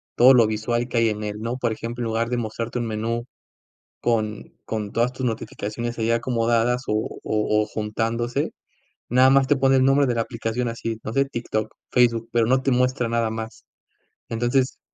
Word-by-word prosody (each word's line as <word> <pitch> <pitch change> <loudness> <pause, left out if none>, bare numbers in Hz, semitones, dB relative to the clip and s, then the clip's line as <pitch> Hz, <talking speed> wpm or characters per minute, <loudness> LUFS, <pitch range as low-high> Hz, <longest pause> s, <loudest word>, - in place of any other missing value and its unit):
todo 130 +2 +8
lo 115 -2 +6
visual 120 +3 -1
que 120 - -3
hay 115 -1 +4
en 105 0 -3
él, 105 0 -4
¿no? 120 +3 -3
Por 120 -3 0
ejemplo, 115 +2 -5
en - - -2
lugar 115 +1 -1
de 125 - -1
mostrarte 115 +1 -3
un 120 - -2
menú 115 +2 -2 0.8
con 110 -3 -1
con 105 -2 -4
todas 120 +2 +1
tus 130 0 -3
notificaciones 115 +1 -4
ahí 115 +1 0
acomodadas, 115 +1 +1
o 110 +1 -2
o 105 0 +1
o, - - -3
juntándose, 115 +3 -2 0.6
nada 130 +2 +5
más 135 0 +4
te 145 - +4
pone 135 0 +3
el 130 - +4
nombre 135 0 +4
de 120 - 0
la 115 - +1
aplicación 115 +1 -3
así, 115 -1 -4
no 110 - -5
sé, 135 - +3
TikTok, 115 -4 -3 0.2
Facebook, 115 -2 +3
pero 115 -1 +3
no 130 +1 +3
te 135 - +2
muestra 125 -1 +1
nada 115 -1 0
más. 110 0 -7 0.6
Entonces 120 +3 0
115 Hz, 195 wpm, -23 LUFS, 110-125 Hz, 0.8 s, todo